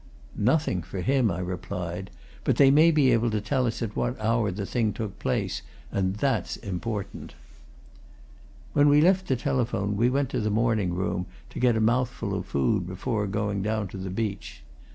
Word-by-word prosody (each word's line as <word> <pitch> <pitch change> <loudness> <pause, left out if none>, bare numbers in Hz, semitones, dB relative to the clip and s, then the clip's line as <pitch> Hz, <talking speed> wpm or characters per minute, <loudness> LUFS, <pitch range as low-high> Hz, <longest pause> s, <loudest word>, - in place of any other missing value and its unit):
"Nothing 125 - +1
for 90 +3 -6
him," 130 0 +2
I - - -2
replied. 90 0 -4 0.3
"But - - +2
they 135 -1 +6
may 155 +4 +6
be 145 -5 +4
able 115 0 +3
to 110 -1 0
tell 130 +4 0
us 115 +1 -2
at 105 -2 -4
what 120 0 -1
hour 110 0 +1
the 100 +2 -4
thing 110 0 0
took 110 -4 -5
place. - - -1 0.3
And 95 0 0
that's 115 -4 0
important." 100 - -5 1.4
When 145 0 +5
we 145 +1 +6
left 185 +4 +4
the 130 - +2
telephone 120 -6 -1
we 115 +4 +3
went 135 0 0
to - - -1
the 110 - 0
morning 110 -4 +1
room, 90 0 -2 0.2
to - - -6
get 120 -2 +3
a - - +1
mouthful 115 -2 0
of 95 -2 -3
food 90 +7 +1
before 105 +3 -2
going 100 0 -1
down 105 -1 -1
to 95 - -8
the 95 0 -5
beach. 95 - -4
110 Hz, 185 wpm, -26 LUFS, 95-125 Hz, 1.4 s, they